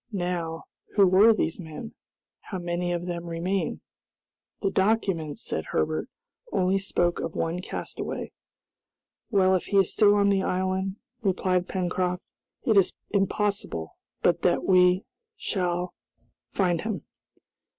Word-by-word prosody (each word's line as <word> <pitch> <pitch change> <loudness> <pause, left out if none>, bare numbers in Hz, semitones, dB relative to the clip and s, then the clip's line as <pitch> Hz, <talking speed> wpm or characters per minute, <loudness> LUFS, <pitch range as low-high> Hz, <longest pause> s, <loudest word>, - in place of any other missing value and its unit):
Now, 175 -4 -2 0.3
who 200 -2 +7
were 190 +5 +7
these 195 -6 0
men? 160 +6 -7 0.5
How 190 - -6
many 175 0 -2
of 175 0 -2
them 175 -1 -4
remain?" 175 +3 -1 0.8
"The 195 - +2
document," 190 -6 +1
said - - -3
Herbert, - - -1 0.4
"only 190 +1 +2
spoke 175 -3 0
of 165 - -4
one 165 +2 -1
castaway." - - -5 1.0
"Well, 190 -4 +4
if 185 - +1
he 200 - +1
is 195 -2 +4
still 205 -2 +5
on 200 -1 +4
the 195 -1 +3
island," 190 +1 -1 0.3
replied 185 -3 +1
Pencroft, 180 0 -1 0.4
"it 225 -6 +3
is 195 - +4 0.2
impossible 200 - -1 0.3
but 170 -1 +3
that 175 - +2
we 180 0 +4 0.3
shall 180 - -1 0.6
find 175 -4 +1
him." 215 -7 -4
185 Hz, 130 wpm, -27 LUFS, 175-195 Hz, 1.0 s, who